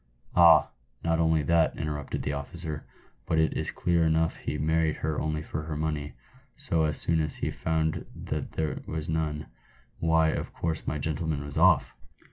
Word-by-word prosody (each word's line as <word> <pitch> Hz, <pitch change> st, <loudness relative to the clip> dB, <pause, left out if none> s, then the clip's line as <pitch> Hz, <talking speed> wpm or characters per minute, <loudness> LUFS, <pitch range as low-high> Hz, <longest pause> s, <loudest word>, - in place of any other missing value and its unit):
"Ah! 85 Hz, -2 st, +7 dB, 0.3 s
not 80 Hz, 0 st, +1 dB
only 80 Hz, -2 st, +3 dB
that," 85 Hz, +2 st, +3 dB
interrupted 75 Hz, -1 st, -3 dB
the 70 Hz, -, -1 dB
officer, 75 Hz, +2 st, -6 dB, 0.4 s
"but 80 Hz, -, +1 dB
it 80 Hz, 0 st, +3 dB
is -, -, -2 dB
clear 85 Hz, -1 st, +1 dB
enough 80 Hz, 0 st, +2 dB
he -, -, -3 dB
married 80 Hz, +1 st, +1 dB
her 75 Hz, -1 st, -2 dB
only 75 Hz, 0 st, -1 dB
for 75 Hz, -, -4 dB
her 75 Hz, 0 st, -4 dB
money, 75 Hz, -2 st, -2 dB, 0.4 s
so 80 Hz, -1 st, +1 dB
as 75 Hz, -2 st, -1 dB
soon 80 Hz, -1 st, +1 dB
as 75 Hz, -2 st, -3 dB
he -, -, -2 dB
found 80 Hz, -1 st, -1 dB
that -, -, -4 dB
there 80 Hz, -1 st, -2 dB
was 80 Hz, -1 st, -4 dB
none, 75 Hz, -2 st, -1 dB, 0.5 s
why, 80 Hz, -1 st, +3 dB
of -, -, -3 dB
course 80 Hz, -2 st, -3 dB
my 75 Hz, -, 0 dB
gentleman 75 Hz, 0 st, -2 dB
went 70 Hz, -1 st, -7 dB
off." -, -, +4 dB
80 Hz, 175 wpm, -28 LUFS, 75-80 Hz, 0.5 s, Ah